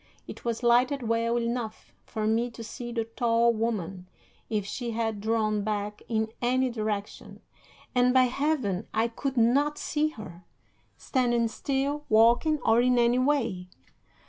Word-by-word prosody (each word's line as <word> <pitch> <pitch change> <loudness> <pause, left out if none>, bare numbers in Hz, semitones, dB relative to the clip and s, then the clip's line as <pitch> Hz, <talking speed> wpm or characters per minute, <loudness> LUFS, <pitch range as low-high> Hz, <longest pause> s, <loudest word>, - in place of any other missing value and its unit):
It - - -9
was 235 0 -3
lighted 250 +3 +3
well 230 +1 +1
enough 235 -2 -4
for 215 -2 -3
me 225 +3 +1
to 230 0 -10
see 240 +2 -7
the 230 -1 -1
tall 235 0 +2
woman, 195 -5 -3 0.4
if 210 -3 -1
she 240 +4 -4
had 225 -2 -2
drawn 215 -1 0
back 210 0 -3
in 220 -1 0
any 255 +1 +1
direction, 215 -3 -4 0.5
and, 250 0 +4
by 260 0 +5
Heaven! 255 -7 -1
I 225 +2 +2
could 265 +3 -4
not 280 +6 +3
see 305 0 0
her, 210 - -10 0.5
standing 240 -3 +1
still, 280 +5 -2
walking, 235 +8 +4
or 225 +1 +5
in 250 0 +3
any 240 +1 +3
way! 250 -10 0
235 Hz, 145 wpm, -27 LUFS, 220-250 Hz, 0.5 s, by